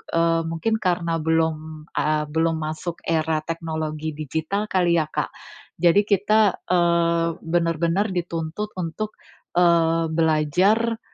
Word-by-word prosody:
eee, 165 0 +3
mungkin 165 +7 -1
karena 170 -4 0
belum, 160 -1 -1
eee, 155 0 0
belum 165 +1 +1
masuk 155 +2 -5
era 160 -1 0
teknologi 155 -2 -4
digital 160 +8 -3
kali 175 -2 +3
ya, - - +2
Kak. - - -2 0.5
Jadi 175 +3 +5
kita, 210 0 +3
eee, 170 -1 +2 0.2
benar-benar 170 +3 +1
dituntut 170 +4 -3
untuk, 195 +5 -4 0.4
eee, 165 -2 +3
belajar, 175 +9 +2
165 Hz, 115 wpm, -23 LUFS, 160-180 Hz, 0.5 s, Jadi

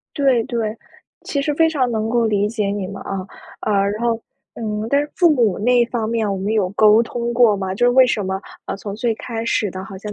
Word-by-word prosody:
对 270 -5 +3
对， 225 -3 -3 0.5
其 280 - -2
实 300 +1 0
非 325 +2 +4
常 270 -6 0
能 220 -1 -1
够 235 0 +2
理 205 -1 +1
解 210 -2 -2
你 200 -1 -2
们， 195 +1 -8
啊。 190 -1 -5 0.3
呃， 215 - -1 0.2
然 210 +2 -5
后 230 -1 0 0.3
嗯 215 -1 -3
但 280 +3 +3
是 295 0 -4
父 350 - +5
母 225 -9 +2
那 240 +3 +3
方 230 -2 -2
面， 225 -2 0
我 - - -2
们 200 +3 -2
有 210 -4 +1
沟 215 +2 +5
通 235 0 -3
过 235 -4 +5
吗？ 190 -1 -3
就 225 - +1
是 245 - +5
为 255 +1 +6
什 225 -4 0
么 190 0 -2 0.2
啊 - - -4
从 200 0 -6
最 230 +2 0
开 225 -1 -5
始 215 -3 0
的 185 0 -6
好 195 -2 -9
像 210 +2 -7
225 Hz, 260 characters per minute, -20 LUFS, 205-240 Hz, 0.5 s, 为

